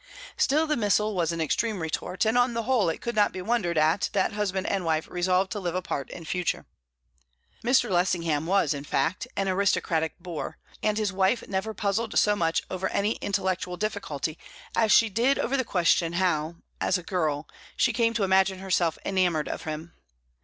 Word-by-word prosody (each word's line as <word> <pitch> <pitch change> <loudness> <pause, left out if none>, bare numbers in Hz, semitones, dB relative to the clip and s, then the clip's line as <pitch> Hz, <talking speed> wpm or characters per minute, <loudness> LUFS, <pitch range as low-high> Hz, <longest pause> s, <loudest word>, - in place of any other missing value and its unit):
Still, 305 +4 +2
the 305 -1 0
missile 210 -1 +1
was 170 -3 0
an 165 - -4
extreme 205 +7 0
retort, 170 +4 -2
and 220 +2 +2
on 245 -1 +3
the 230 - -1
whole 240 -7 +2
it 160 - -4
could 235 - -3
not 210 -1 +3
be 185 - -6
wondered 185 -4 0
at 155 +4 +2
that 200 +1 +1
husband 195 -2 -1
and 195 -2 -1
wife 160 -1 0
resolved 185 +2 +1
to 215 - -3
live 180 -2 -3
apart 175 -7 -3
in 170 - -9
future. 180 +2 -2 1.0
Mr. 245 +1 +3
Lessingham 170 -5 +1
was, 195 -3 +2
in 140 -1 -6
fact, 145 +4 -1
an 195 - 0
aristocratic 185 -4 +1
boor, 170 -2 -6 0.2
and 215 0 +1
his 210 -3 0
wife 195 +5 +1
never 200 +3 -2
puzzled 210 +3 -1
so 210 0 +4
much 165 -3 0
over 185 +1 -2
any 205 +2 +1
intellectual 185 -2 -2
difficulty 170 -8 -3 0.4
as 220 -2 +3
she 230 - +6
did 235 +7 +2
over 260 - 0
the 260 - +1
question 170 -5 +2
how, 170 -3 0 0.3
as 185 - +2
a 180 - -8
girl, 160 -5 -1 0.3
she 235 - +3
came 230 0 +1
to 215 - +1
imagine 190 0 +3
herself 185 -3 0
enamoured 180 -5 +1
of - - -5
him. 160 +2 -6
190 Hz, 190 wpm, -27 LUFS, 170-215 Hz, 1.0 s, she